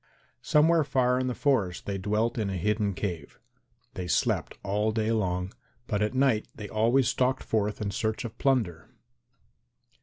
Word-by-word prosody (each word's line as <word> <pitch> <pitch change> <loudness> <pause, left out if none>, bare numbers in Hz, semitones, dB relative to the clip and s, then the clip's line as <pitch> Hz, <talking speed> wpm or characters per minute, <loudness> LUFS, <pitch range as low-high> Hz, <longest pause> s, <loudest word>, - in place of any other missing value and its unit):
Somewhere 160 +2 +4
far 125 -2 +2
in 130 - -1
the 125 - -2
forest 115 - 0
they 100 -1 -3
dwelt 110 +4 0
in 105 -2 -1
a 95 - -2
hidden 105 +2 0
cave; 90 -5 -5 0.5
they 90 -1 -5
slept - - 0
all 105 +2 0
day 110 0 0
long, 90 -3 -1 0.3
but 105 -2 -1
at 105 +4 0
night 130 -5 +2
they 105 -2 -7
always 115 +5 +2
stalked 130 +1 +1
forth 105 -1 -1
in 100 -2 -2
search 110 +6 -2
of 115 -1 -7
plunder. 110 - 0
110 Hz, 160 wpm, -28 LUFS, 100-125 Hz, 0.5 s, Somewhere